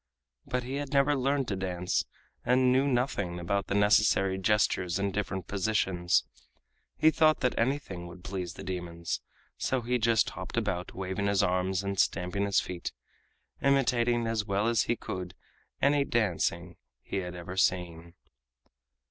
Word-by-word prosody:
But 125 0 -1
he 130 +3 -4
had 145 -1 -5
never 140 +1 +4
learned 135 0 0
to 100 - -1
dance, 90 -1 -1 0.4
and 125 +1 +3
knew 130 +2 +3
nothing 120 -9 -1
about 100 +3 -1
the 100 - -1
necessary 100 -2 +3
gestures 95 -3 +1
and 100 -1 -1
different 95 -3 -3
positions. 95 -3 +1 0.7
He 160 - +5
thought 155 -1 +3
that 125 - +2
anything 115 -9 -2
would 85 +1 -12
please 90 -3 -5
the - - -8
demons, 85 -2 -4 0.4
so 130 -1 0
he 125 +1 0
just 115 -1 +3
hopped - - -7
about, 90 0 -2
waving 95 +2 -2
his 100 -1 +2
arms 90 +1 0
and 100 -1 -3
stamping 90 +3 +1
his 100 0 +3
feet, 90 -6 -5 0.7
imitating 120 -4 +2
as 115 -2 0
well 100 +1 0
as 115 -3 +2
he 120 - +1
could 90 -4 -6 0.5
any 140 0 +4
dancing 90 -7 -1 0.3
he - - -4
had 90 -2 -4
ever 90 +1 -7
seen. 85 -2 0
100 Hz, 155 wpm, -29 LUFS, 90-120 Hz, 0.7 s, He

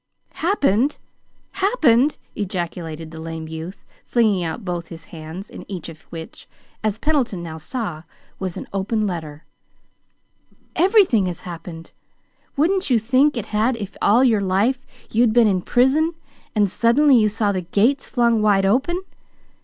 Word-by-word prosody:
"Happened! 285 - +2 0.5
Happened!" 305 - +3 0.2
ejaculated 170 -5 -4
the 160 - -9
lame 160 0 -6
youth, 160 +4 -8 0.2
flinging 215 -6 +2
out 165 +6 -4
both 175 -2 -3
his 165 -1 -10
hands, 165 +5 -8
in - - -10
each 180 -3 -5
of 160 -1 -12
which, 165 -1 -9 0.3
as 215 -1 0
Pendleton 250 - 0
now 160 -1 -7
saw, 205 - -4 0.4
was 185 -3 -4
an - - -6
open 210 +3 0
letter. 160 -5 -5 1.3
"Everything 365 - +4
has 175 0 -5
happened! 165 -1 -9 0.7
Wouldn't 365 +4 +2
you 245 - +4
think 255 +5 +2
it 220 - -3
had 225 +4 +2
if 200 -3 -7
all 230 +5 +5
your 225 -5 +3
life 205 +8 0 0.2
you'd 230 0 +3
been 240 -1 +5
in 190 -3 +1
prison, 280 - +2 0.4
and 205 -1 +3
suddenly 250 +8 +4
you 215 -3 +4
saw 210 0 0
the 185 -2 -2
gates 220 +10 +1
flung 235 -3 +2
wide 200 -2 +3
open? 270 - +1
210 Hz, 145 wpm, -21 LUFS, 175-255 Hz, 1.3 s, all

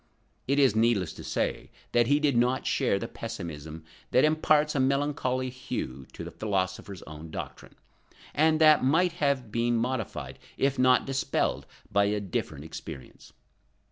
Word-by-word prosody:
It 140 +2 +2
is 135 -7 +4
needless 110 -7 +2
to - - -10
say - - -2 0.2
that 120 -1 +3
he 145 +1 +4
did 145 -4 +2
not 125 +2 +2
share 130 -7 +1
the 115 - -4
pessimism 80 -10 -7 0.3
that 130 - +4
imparts 155 -1 +3
a 140 - 0
melancholy 130 -1 0
hue 65 - -5
to - - -7
the - - -7
philosopher's 95 -2 -3
own 80 +1 -10
doctrine, - - -8 0.6
and 155 +1 +3
that 155 -3 +6
might 165 +7 +3
have 135 -6 +1
been 120 +1 +1
modified 110 - -3 0.2
if 135 -1 +1
not 130 0 +4
dispelled 135 -1 -1 0.2
by 100 0 +3
a 105 +1 0
different 80 -6 -4
experience. 80 -3 -10
120 Hz, 150 wpm, -28 LUFS, 95-140 Hz, 0.6 s, that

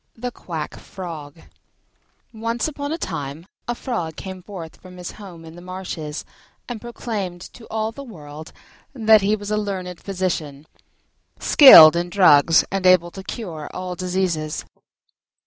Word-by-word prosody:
THE 245 +2 -4
QUACK 165 -8 -6
FROG 165 -5 -9 0.9
Once 230 +3 -2
upon 285 -1 -5
a 325 - -2
time 155 - -5 0.2
a 240 - -1
Frog 175 -12 -4
came 190 +1 -8
forth 175 -4 -9
from 180 -1 -13
his 180 -1 -7
home 180 -6 -12
in 160 0 -12
the 175 - -11
marshes 180 -4 -6 0.4
and 240 -4 -6
proclaimed 210 -7 -5
to 235 - -14
all 220 0 -2
the 255 - -10
world 155 - -11 0.4
that 220 -3 +5
he 205 +2 +2
was 205 0 -7
a 210 - +1
learned 185 -4 -4
physician, 170 -7 -3 0.7
skilled 165 - +9
in 175 +1 -1
drugs 165 -4 +5
and 195 -1 +1
able 175 -2 +5
to 190 - -9
cure 175 -7 -7
all 185 0 -4
diseases. 180 -4 -2
185 Hz, 145 wpm, -22 LUFS, 165-215 Hz, 0.9 s, skilled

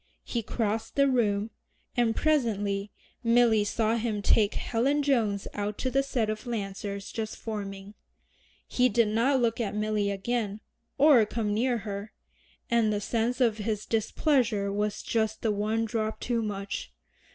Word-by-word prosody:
He 235 - -2
crossed 220 0 -2
the 280 0 +4
room, 220 -4 +1 0.4
and 235 -3 +2
presently 205 -9 +1 0.3
Milly 230 -2 +4
saw 220 +2 +1
him 215 -3 -2
take 210 0 +3
Helen 275 +6 +1
Jones 225 -8 +1
out 205 0 -3
to 260 - -2
the 270 +2 +3
set 255 -5 -1
of 215 +3 -4
Lancers 200 -2 -4
just 220 -1 -4
forming. 200 -2 -6 0.7
He 250 0 +3
did 230 -1 +3
not 245 +5 +2
look 235 -1 +1
at 210 -2 -2
Milly 210 -1 0
again, 205 +1 -2 0.4
or 280 -5 +7
come 215 -2 -1
near 240 +3 +1
her, 205 0 -6 0.5
and 230 -2 +2
the 205 - 0
sense 230 +4 -1
of 230 -4 +2
his 210 0 -2
displeasure 220 -3 +1
was 210 0 -2
just 220 -1 -1
the 225 - +2
one 215 +2 0
drop 220 -1 -2
too 235 -2 -1
much. 200 - -4
220 Hz, 150 wpm, -28 LUFS, 205-235 Hz, 0.7 s, or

